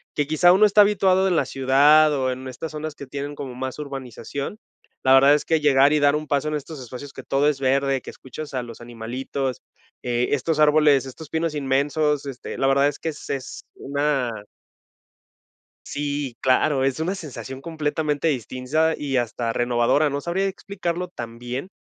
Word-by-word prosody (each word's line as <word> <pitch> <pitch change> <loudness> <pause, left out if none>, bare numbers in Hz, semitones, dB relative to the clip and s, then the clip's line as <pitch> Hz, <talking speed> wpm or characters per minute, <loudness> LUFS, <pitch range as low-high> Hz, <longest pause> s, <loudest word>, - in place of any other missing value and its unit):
que 145 -1 0
quizá, 175 +3 +5
uno 210 +3 +6
está 210 +1 +5
habituado 190 -2 +3
en 180 - +1
la - - +3
ciudad 145 +4 +4
o 130 -2 0
en 130 +1 -6
estas 130 +5 -6
zonas 155 0 -5
que 140 - -10
tienen 140 +2 -5
como 135 -3 -7
más 130 +2 -5
urbanización. 140 - -6 0.4
La 130 - +3
verdad 140 +2 +7
es 150 - +1
que 160 -1 +1
llegar 140 -1 +4
y 150 - +3
dar 145 0 +4
un 155 0 -3
paso 145 +1 0
en - - -3
estos 150 +1 -5
espacios 130 +2 -9
que - - -9
todo 140 +2 +2
es 140 -2 -2
verde, 135 0 +1
que - - -9
escuchas 145 +3 -9
a 130 - -1
los 115 -2 -10
animalitos, 120 +3 -5 0.4
eh, 120 0 0
estos 150 +3 0
árboles, 150 -3 +5
estos 150 +4 -10
pinos 160 -1 -1
inmensos, 145 +1 0
este, 130 -2 -7
la 135 - +2
verdad 140 +1 +4
es 145 - -4
que 165 - -3
es 150 - -9
es 135 -1 -6
una 135 -6 -2 1.4
Sí, 145 -3 -3
claro, 130 +1 +2
es 135 +2 0
una 180 +5 -1
sensación 135 -5 -8
completamente 150 -1 -1
distinta 140 +4 0
y 140 -2 -2
hasta 115 -1 -1
renovadora, 120 +5 +2
no 140 +1 -2
sabría 180 +5 -1
explicarlo 180 -2 -4
también, 120 +2 -6
140 Hz, 180 wpm, -23 LUFS, 130-155 Hz, 1.4 s, verdad